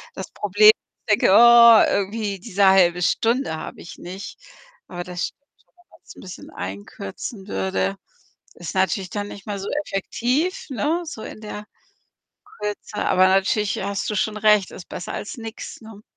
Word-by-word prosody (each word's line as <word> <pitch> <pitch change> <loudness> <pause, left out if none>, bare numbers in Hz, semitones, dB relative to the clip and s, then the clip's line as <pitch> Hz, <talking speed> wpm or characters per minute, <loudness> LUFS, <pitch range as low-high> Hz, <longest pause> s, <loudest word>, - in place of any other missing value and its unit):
das - - -7
Problem, 210 +2 +5 0.4
dass 210 - +5
ich - - -11
denke: 190 - +4
„Oh, 235 0 +8
irgendwie 200 0 -2
diese 200 -1 +1
1/2 180 -2 +4
Stunde 230 +2 +1
habe - - -8
ich 170 - -11
nicht.“ 185 +3 -9 0.5
Aber 175 -1 -6
das 180 -1 -3
stimmt - - -17 0.2
schon, - - -39
wenn 355 0 -28
man's - - -16
'n - - -13
bisschen 185 -1 -10
einkürzen 100 - -7
würde. 95 0 -1 0.6
Ist 175 +1 -7
natürlich 190 0 0
dann 205 -1 -4
nicht 200 - -11
mehr 205 -2 -4
so 195 - -6 0.2
effektiv, 250 - -2
ne, 310 +7 -1
so 310 -9 -8
in - - -9
der 210 -1 -7 1.0
Kürze, 210 0 -5
aber 185 0 +4
natürlich 195 +2 +1
hast 200 +1 -3
du 210 - -2
schon 215 +2 -1
recht, 210 -2 +3
ist 175 - -11
besser 175 - -6
als 205 - -6
nix, 225 0 -8
ne? 220 -1 -13
205 Hz, 170 wpm, -22 LUFS, 185-220 Hz, 1.0 s, Oh